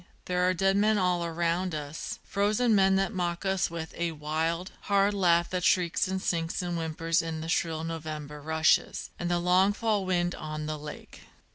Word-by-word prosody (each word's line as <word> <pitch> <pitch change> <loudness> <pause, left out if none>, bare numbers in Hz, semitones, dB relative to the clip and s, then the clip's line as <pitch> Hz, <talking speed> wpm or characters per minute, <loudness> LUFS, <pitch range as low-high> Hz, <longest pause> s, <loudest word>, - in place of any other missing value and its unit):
there 180 0 +1
are - - +4
dead 195 +2 +2
men 210 +1 +3
all 180 -2 +1
around 170 +1 -1
us 150 0 -5
Frozen 210 +4 +1
men 190 -1 +4
that 195 +3 0
mock 175 0 -2
us 190 -1 +1
with 165 -1 -6
a 170 -1 -2
wild, 160 +4 -2 0.2
hard 200 0 +3
laugh 170 -3 +3
That 180 -1 -1
shrieks 175 -1 +2
and 190 0 -2
sinks 170 -1 -1
and 175 -1 -2
whimpers 165 0 0
in 160 -1 -4
the 160 - -5
shrill 165 -1 0
November 155 -2 -6
rushes, 160 +1 +1
And 175 - -2
the 175 - +2
long 180 +3 +3
fall 215 -2 0
wind 175 -1 0
on 155 0 -5
the 155 0 -4
lake. 150 0 -10
175 Hz, 185 wpm, -28 LUFS, 160-190 Hz, 0.2 s, are